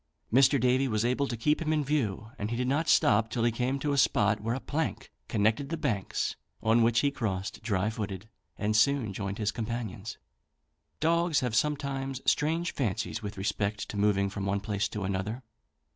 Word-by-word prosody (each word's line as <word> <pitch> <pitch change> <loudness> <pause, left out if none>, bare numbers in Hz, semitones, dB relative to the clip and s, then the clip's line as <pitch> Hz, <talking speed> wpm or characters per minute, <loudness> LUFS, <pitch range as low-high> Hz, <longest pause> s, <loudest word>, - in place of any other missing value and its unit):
Mr. 135 +2 +5
Davy 130 +2 +3
was 110 -2 0
able 130 +3 +1
to 120 - -4
keep 150 +8 +1
him 155 -1 0
in 155 -1 +2
view, 115 -7 -1
and 105 - -2
he 120 - -2
did 125 0 0
not 150 +5 +1
stop 110 0 +4
till 115 - -1
he 120 - +3
came 125 +4 -1
to 145 +1 -1
a 140 - +2
spot 105 -3 +3
where 115 +2 -1
a - - -3
plank 155 +4 -3 0.2
connected 110 +5 +1
the 165 - -2
banks, 105 -10 -1 0.3
on 115 +2 +4
which 115 0 +4
he 140 - +2
crossed 100 -7 -3
dry 100 -3 0
footed, 105 -2 -4 0.3
and 105 +1 0
soon 120 -2 +3
joined 100 0 -4
his 105 -1 0
companions. 110 -2 -5 0.8
Dogs 170 -1 +2
have 125 -3 -1
sometimes 135 -1 -1
strange 165 +3 +1
fancies 115 -2 -2
with 105 -1 -6
respect 100 +1 -2
to - - -6
moving 100 -1 +2
from 100 0 -5
one 100 +1 +1
place 100 +1 -1
to 105 - -4
another. 100 +6 -3
115 Hz, 190 wpm, -29 LUFS, 105-135 Hz, 0.8 s, Mr